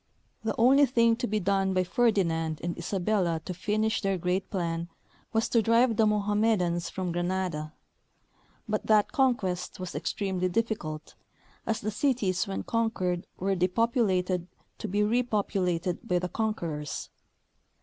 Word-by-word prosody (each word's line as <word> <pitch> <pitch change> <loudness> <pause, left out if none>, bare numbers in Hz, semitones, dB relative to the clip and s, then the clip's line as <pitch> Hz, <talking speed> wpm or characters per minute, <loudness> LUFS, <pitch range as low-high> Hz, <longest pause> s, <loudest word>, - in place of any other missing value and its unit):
The 220 -1 -1
only 270 +5 +6
thing 230 -2 +3
to 245 - -2
be 215 +1 0
done 195 0 +1
by 185 - +3
Ferdinand 170 -8 +1
and 175 0 -2
Isabella 180 -1 0
to 185 - -4
finish 215 +5 0
their 195 -2 0
great 180 +2 -1
plan 170 -3 -2 0.4
was 225 -1 +1
to 230 - +4
drive 230 +2 +3
the 220 -1 +4
Mohammedans 205 -4 +1
from 185 -2 -3
Granada; 175 -3 -2 0.9
but 215 0 -2
that 215 -1 +4
conquest 210 - 0
was 185 -1 -5
extremely 185 -2 -1
difficult, 175 -7 -2 0.5
as 225 - 0
the 215 - -2
cities 210 -7 0
when 195 - -3
conquered 185 -6 -1
were 195 +2 0
depopulated 185 -2 +1 0.3
to - - -4
be 205 +3 +1
repopulated 200 -6 0
by 180 - +2
the 180 0 -2
conquerors. 170 -10 -3
195 Hz, 140 wpm, -28 LUFS, 180-220 Hz, 0.9 s, only